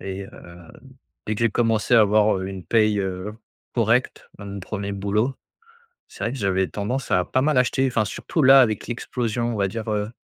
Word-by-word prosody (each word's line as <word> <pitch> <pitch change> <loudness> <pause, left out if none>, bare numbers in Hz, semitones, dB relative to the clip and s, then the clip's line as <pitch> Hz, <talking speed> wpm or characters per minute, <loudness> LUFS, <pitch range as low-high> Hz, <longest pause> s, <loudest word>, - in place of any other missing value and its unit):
Et 95 0 -6
heu, 85 -3 -14 0.6
dès 110 - -1
que 105 - -6
j'ai 115 - +3
commencé 115 +1 +1
à 115 - +7
avoir, 105 -1 +3
heu, 95 - -4
une 95 -3 -8
paye, 105 +2 +2
heu, 95 +1 -4 0.4
correcte - - 0
dans 100 - -9
mon 100 0 -6
premier 100 +1 -5
boulot, 105 +6 -1 0.8
c'est - - -8
vrai 115 - -1
que - - -6
j'avais 95 -2 +1
tendance 125 +6 -4
à 90 0 +2
pas 130 - 0
mal 150 -1 +1
acheter, 130 +2 +2
enfin 110 -4 0
surtout 155 - -2
là, 135 +1 +8
avec 110 -4 0
l'explosion, 120 -1 -3
on - - -4
va 100 -1 +1
dire, 115 +3 -6
heu, 105 0 -1
105 Hz, 205 wpm, -23 LUFS, 100-120 Hz, 0.8 s, là